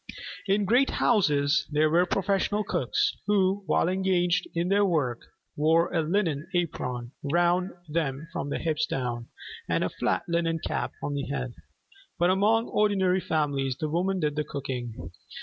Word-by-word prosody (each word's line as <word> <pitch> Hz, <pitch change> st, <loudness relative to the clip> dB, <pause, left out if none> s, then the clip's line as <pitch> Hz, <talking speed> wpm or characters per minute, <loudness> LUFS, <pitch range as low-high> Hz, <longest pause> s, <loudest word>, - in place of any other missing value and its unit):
In 200 Hz, +1 st, +2 dB
great 245 Hz, +7 st, +4 dB
houses 150 Hz, -9 st, +2 dB
there 155 Hz, +1 st, +3 dB
were 175 Hz, +3 st, +3 dB
professional 200 Hz, +2 st, 0 dB
cooks, 150 Hz, -, 0 dB
who, 200 Hz, -1 st, +2 dB
while 155 Hz, -, +2 dB
engaged 180 Hz, -1 st, +1 dB
in 170 Hz, +2 st, 0 dB
their 200 Hz, +1 st, +4 dB
work, 145 Hz, -, +1 dB, 0.4 s
wore 160 Hz, +3 st, +2 dB
a 165 Hz, -, +2 dB
linen 160 Hz, -3 st, 0 dB
apron 125 Hz, -8 st, -2 dB
round 175 Hz, +5 st, +2 dB, 0.2 s
them 150 Hz, -1 st, -2 dB
from 145 Hz, -, -3 dB
the -, -, -1 dB
hips 160 Hz, -2 st, -1 dB
down, 120 Hz, -2 st, -3 dB, 0.4 s
and -, -, +1 dB
a -, -, 0 dB
flat -, -, -1 dB
linen 170 Hz, -1 st, 0 dB
cap -, -, -3 dB
on 145 Hz, -, -2 dB
the 140 Hz, -1 st, -3 dB
head. 125 Hz, -3 st, -3 dB, 0.6 s
But 175 Hz, +1 st, +3 dB
among 215 Hz, +4 st, +3 dB
ordinary 190 Hz, -3 st, +2 dB
families 140 Hz, -5 st, -1 dB
the 155 Hz, -, -2 dB
women 185 Hz, +3 st, 0 dB
did 150 Hz, -3 st, 0 dB
the 150 Hz, -, 0 dB
cooking. 125 Hz, -, -5 dB
165 Hz, 155 wpm, -27 LUFS, 145-190 Hz, 0.6 s, great